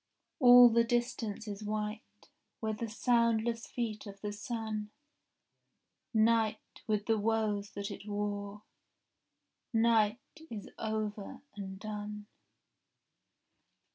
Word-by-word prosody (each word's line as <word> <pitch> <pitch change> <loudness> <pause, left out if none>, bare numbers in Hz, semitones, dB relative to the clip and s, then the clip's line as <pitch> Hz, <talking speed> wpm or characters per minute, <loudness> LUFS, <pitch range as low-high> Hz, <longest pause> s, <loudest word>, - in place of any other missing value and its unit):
All 245 -2 +10
the 230 0 +4
distance 230 -2 -1
is 205 0 -5
white 210 +2 -5 0.3
With 220 -1 -2
the 230 - -3
soundless 230 0 +1
feet 220 -3 -4
of 200 0 -9
the 210 -1 -3
sun. 220 -2 -4 1.2
Night, 225 -1 +3 0.3
with 210 -1 0
the 225 -1 +2
woes 210 -2 0
that 200 +1 -4
it 200 - -9
wore, 205 0 -3 1.1
Night 225 -1 +3 0.3
is 215 -3 -7
over 215 -2 -3
and 190 -2 -7
done. 210 0 -6
215 Hz, 105 wpm, -32 LUFS, 210-230 Hz, 1.2 s, All